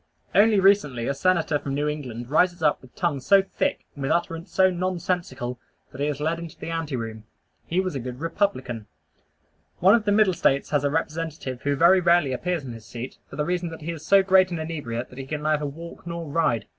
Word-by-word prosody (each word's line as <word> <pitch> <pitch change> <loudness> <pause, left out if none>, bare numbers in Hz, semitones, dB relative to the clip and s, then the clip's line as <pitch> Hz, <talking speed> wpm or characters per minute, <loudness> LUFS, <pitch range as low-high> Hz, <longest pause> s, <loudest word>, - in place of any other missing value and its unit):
Only 210 0 +5
recently 170 -12 +3
a 140 - +1
Senator 160 -1 +1
from 140 -1 -4
New 145 +1 0
England 125 -5 -5
rises 175 +1 +2
up 150 - +2
with 130 - -18
tongue 170 -6 0
so 195 +9 +5
thick, 190 - -2
and 145 - -10
with 135 - -1
utterance 170 0 -1
so 190 0 +4
nonsensical, 175 -9 -2 0.3
that 130 - -8
he 145 - +1
is 145 -2 -2
led 160 +3 -1
into 170 -2 -9
the 165 - -6
anteroom. 120 -9 -4 0.4
He 175 - 0
was 185 -2 -1
a 135 - -3
good 125 0 -6
"Republican." 130 - -2 0.9
One 190 +3 +6
of 230 -2 +3
the 205 - +2
Middle 205 -2 +4
States 140 -4 +1
has 145 -2 +2
a 145 - +2
representative 155 -4 -3
who 145 0 0
very 170 +6 +6
rarely 170 -6 +3
appears 170 +4 -2
in 125 - -6
his 115 -2 -10
seat, 120 +2 -7
for - - -9
the 150 +1 -1
reason 175 0 -1
that 160 0 -9
he 165 +3 -3
is 160 -2 -8
so 195 -1 +5
great 190 -1 +5
an 175 - -3
inebriate 145 -7 -4
that 125 - -10
he 135 - -5
can 150 +1 -4
neither 150 -1 +1
walk 165 +4 -9
nor 170 0 -4
ride. 140 -8 +1
160 Hz, 220 wpm, -25 LUFS, 135-180 Hz, 0.9 s, One